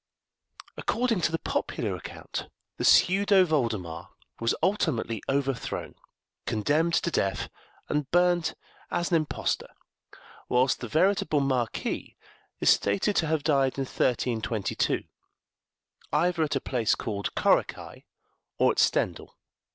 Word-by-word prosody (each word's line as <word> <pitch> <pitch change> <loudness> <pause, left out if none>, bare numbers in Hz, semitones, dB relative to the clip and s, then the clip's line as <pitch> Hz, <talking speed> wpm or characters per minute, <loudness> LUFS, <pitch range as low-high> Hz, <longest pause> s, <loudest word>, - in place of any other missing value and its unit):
According 235 -5 0
to 170 - +1
the 165 - 0
popular - - -2
account, - - -7 0.3
the - - -3
pseudo 195 0 +5
Voldemar 110 - -2 0.3
was 115 0 +1
ultimately 125 - 0
overthrown, 135 -2 -2 0.5
condemned 150 +9 +1
to 170 - 0
death, 95 -9 -1 0.4
and 150 -2 -1
burnt 175 -1 +2 0.3
as 175 +1 -1
an 170 - +5
impostor; 155 -2 -2 0.8
whilst 125 +2 +2
the 120 - -5
veritable 155 - +2
Marquis 130 -5 -2 0.4
is - - +5
stated 100 - +1
to 160 - +2
have 155 -2 0
died 140 -4 +2
in 135 - 0
1322, 115 -4 -1 1.1
either 175 -1 +1
at 150 -2 0
a - - +2
place 120 -4 0
called 100 -2 -4
Korekei, - - 0 0.5
or - - +4
at - - -2
Stendell. - - 0
140 Hz, 120 wpm, -27 LUFS, 115-170 Hz, 1.1 s, pseudo